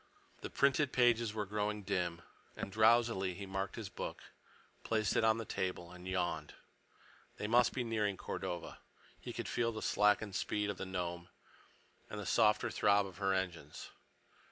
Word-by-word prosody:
The -, -, -5 dB
printed 140 Hz, 0 st, +3 dB
pages 120 Hz, -3 st, +3 dB
were 105 Hz, -1 st, -1 dB
growing 105 Hz, +1 st, -2 dB
dim, 90 Hz, -3 st, -1 dB, 0.3 s
and -, -, -4 dB
drowsily 110 Hz, -3 st, +3 dB
he 100 Hz, -, -6 dB
marked 95 Hz, 0 st, -3 dB
his -, -, -5 dB
book, -, -, -6 dB, 0.6 s
placed 110 Hz, -2 st, +1 dB
it -, -, +3 dB
on 110 Hz, 0 st, +4 dB
the 115 Hz, -, -4 dB
table, 90 Hz, -3 st, -3 dB
and 90 Hz, 0 st, -10 dB
yawned. 85 Hz, -5 st, -2 dB, 0.8 s
They -, -, -4 dB
must 120 Hz, +3 st, +4 dB
be 130 Hz, -, -2 dB
nearing 105 Hz, -4 st, 0 dB
Cordova. 85 Hz, -1 st, -5 dB, 0.4 s
He -, -, -7 dB
could -, -, -5 dB
feel 115 Hz, -1 st, 0 dB
the 110 Hz, -1 st, -6 dB
slackened 105 Hz, 0 st, +3 dB
speed 105 Hz, 0 st, -1 dB
of 100 Hz, -, -8 dB
the 95 Hz, -, -5 dB
Nome 85 Hz, -1 st, -4 dB, 0.8 s
and 105 Hz, -, -5 dB
the 105 Hz, -, -5 dB
softer 110 Hz, +1 st, +3 dB
throb 100 Hz, -1 st, +3 dB
of 95 Hz, -2 st, -10 dB
her 95 Hz, -1 st, +1 dB
engines. 90 Hz, -6 st, -3 dB
105 Hz, 165 wpm, -35 LUFS, 95-110 Hz, 0.8 s, on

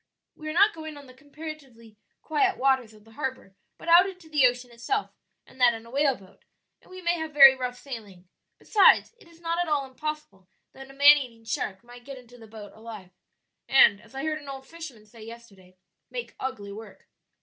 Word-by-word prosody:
We 310 Hz, 0 st, -8 dB
are -, -, -4 dB
not 405 Hz, +5 st, +5 dB
going 315 Hz, -2 st, -9 dB
on 285 Hz, -, -12 dB
the 255 Hz, -, -15 dB
comparatively 275 Hz, -5 st, -11 dB, 0.3 s
quiet 370 Hz, +5 st, +1 dB
waters 265 Hz, -4 st, +1 dB
of 210 Hz, -, -19 dB
the 225 Hz, -, -20 dB
harbor, 260 Hz, -6 st, -6 dB, 0.2 s
but -, -, -13 dB
out 350 Hz, +3 st, +6 dB
into 360 Hz, -4 st, -14 dB
the 285 Hz, -4 st, +5 dB
ocean 245 Hz, 0 st, -4 dB
itself, 400 Hz, -, -3 dB, 0.3 s
and 260 Hz, -, -15 dB
that 240 Hz, -2 st, +5 dB
in 225 Hz, 0 st, -10 dB
a 230 Hz, -, -14 dB
whaleboat, 270 Hz, -9 st, -1 dB, 0.4 s
and -, -, -23 dB
we 370 Hz, 0 st, -11 dB
may 345 Hz, 0 st, 0 dB
have 315 Hz, -2 st, -6 dB
very 275 Hz, -2 st, +10 dB
rough 250 Hz, -1 st, -5 dB
sailing; 210 Hz, -9 st, -10 dB, 0.3 s
besides, 420 Hz, +2 st, +4 dB
it -, -, -19 dB
is 335 Hz, -1 st, -20 dB
not 335 Hz, 0 st, -2 dB
at 350 Hz, -, 0 dB
all 295 Hz, -3 st, 0 dB
impossible 265 Hz, -9 st, -7 dB, 0.2 s
that 270 Hz, 0 st, -12 dB
a -, -, -13 dB
man 290 Hz, +1 st, +8 dB
eating 235 Hz, -5 st, -8 dB
shark 205 Hz, -2 st, -4 dB
might 245 Hz, 0 st, -14 dB
get 275 Hz, +1 st, -9 dB
into 245 Hz, -1 st, -16 dB
the 225 Hz, -, -13 dB
boat 210 Hz, -1 st, -11 dB
alive, 215 Hz, -4 st, -11 dB, 0.6 s
and, 210 Hz, -7 st, +6 dB
as 230 Hz, +4 st, -19 dB
I 270 Hz, -, -4 dB
heard 310 Hz, 0 st, -2 dB
an 285 Hz, -, -11 dB
old 270 Hz, -1 st, -8 dB
fisherman 295 Hz, -11 st, -11 dB
say 220 Hz, +1 st, -17 dB
yesterday, 215 Hz, -5 st, -14 dB, 0.3 s
'make 485 Hz, -1 st, -6 dB
ugly 205 Hz, -6 st, -5 dB
work.'" 220 Hz, +2 st, -12 dB
265 Hz, 205 wpm, -26 LUFS, 225-310 Hz, 0.6 s, very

